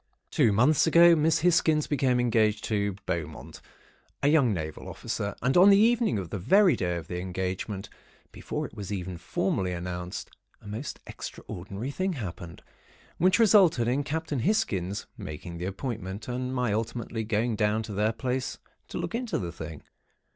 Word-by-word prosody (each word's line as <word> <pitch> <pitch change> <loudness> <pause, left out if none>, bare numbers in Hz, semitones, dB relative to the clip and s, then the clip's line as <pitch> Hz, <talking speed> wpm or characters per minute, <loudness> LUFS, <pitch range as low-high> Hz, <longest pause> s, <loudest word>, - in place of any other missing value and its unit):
"Two 110 - +4
months 130 +11 +4
ago, 170 +1 +7
Miss 160 0 +2
Hisgins 160 -3 +3
became 130 -4 +1
engaged 110 -3 +2
to 100 -2 -1
Beaumont, - - -5 0.6
a 140 - +5
young 145 -6 +4
Naval 80 -5 -4
Officer, 100 0 -4
and 125 +2 +2
on 185 +3 +8
the 200 - +7
evening 230 - +3
of 90 -5 -5
the 100 - -3
very 190 - +5
day 90 -2 -1
of 85 -2 -6
the 90 - -4
engagement, 95 +2 -4 0.4
before - - -4
it - - -10
was 105 -3 -7
even 95 -2 -4
formally 95 0 -1
announced, 90 0 -5 0.3
a 105 - -15
most 110 +7 -5
extraordinary 100 +8 -7
thing 185 +5 -1
happened, 90 - -7 0.6
which 185 +2 +4
resulted 190 - +5
in 135 +4 +1
Captain 155 -1 -2
Hisgins 100 - 0
making 85 +2 -7
the 90 - -3
appointment, 100 0 -5
and 125 +1 -3
my 125 -5 0
ultimately 115 +1 -3
going 110 +1 0
down 105 +1 +1
to 105 - -7
their 105 +2 +1
place 125 +2 -3 0.3
to - - -6
look - - -3
into 235 -1 -1
the 85 -3 -4
thing. 80 -1 -8
110 Hz, 165 wpm, -28 LUFS, 95-150 Hz, 0.6 s, on